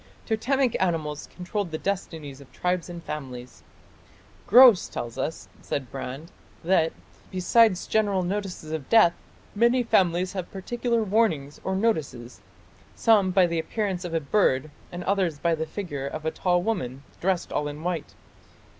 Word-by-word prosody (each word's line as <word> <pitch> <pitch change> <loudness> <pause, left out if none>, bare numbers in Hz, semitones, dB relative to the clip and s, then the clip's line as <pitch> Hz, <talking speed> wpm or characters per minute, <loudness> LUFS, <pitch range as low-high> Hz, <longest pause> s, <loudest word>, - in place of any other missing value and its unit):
" - - -29
Totemic 250 +3 +1
animals 155 -5 -1
controlled 185 +1 -3
the 160 - -3
destinies 160 -7 -4
of 140 - -16
tribes 180 -1 -2
and 170 -1 -8
families. 125 - -7 0.9
"Grose 240 -3 +8
tells 115 -1 -5
us", 160 +5 -3
says 140 - -3
Brand, 135 +5 -6 0.3
"that, 165 -2 +3 0.4
besides 185 +2 +3
general 205 -4 +1
notices 185 -4 -4
of 155 -4 -5
death, 215 -7 +6 0.4
many 235 +4 +3
families 180 -4 +2
have 185 -3 -5
particular 235 +4 -1
warnings 190 -10 0
or 190 - -1
notices: 155 - -2 0.5
some 210 -5 +4
by 185 0 +4
the 170 -1 -1
appearance 190 +2 -2
of 170 -2 -4
a - - +3
bird, 145 -3 +1 0.2
and 175 0 -6
others 185 -6 0
by 170 +3 +1
the 160 0 -2
figure 150 -7 -5
of 155 +2 -6
a 160 - +1
tall 175 0 +1
woman, 140 - -3 0.2
dressed 185 -1 -1
all 150 - 0
in 145 +2 -7
white.... 175 -3 -3
175 Hz, 155 wpm, -26 LUFS, 155-200 Hz, 0.9 s, Grose